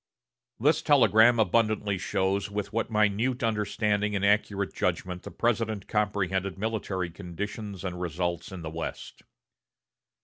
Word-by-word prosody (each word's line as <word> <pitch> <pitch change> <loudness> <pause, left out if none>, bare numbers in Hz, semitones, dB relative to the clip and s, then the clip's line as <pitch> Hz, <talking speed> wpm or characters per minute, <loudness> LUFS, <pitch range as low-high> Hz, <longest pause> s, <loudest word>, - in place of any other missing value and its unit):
This 145 +7 +3
telegram 120 -4 +5
abundantly 105 -3 +2
shows 95 +3 0
with 105 +1 -4
what 115 0 -1
minute 110 +4 +1
understanding 105 -1 0
and 100 0 +1
accurate 100 -1 +1
judgment 90 -1 -2
the - - -8
President 110 -4 -1
comprehended 100 -3 -1
military 95 -4 -2
conditions 100 +2 -6
and 90 -2 -4
results 85 +1 -2
in 90 -3 -7
the 80 - -5
West. 80 0 -6
105 Hz, 125 wpm, -28 LUFS, 95-110 Hz, -, telegram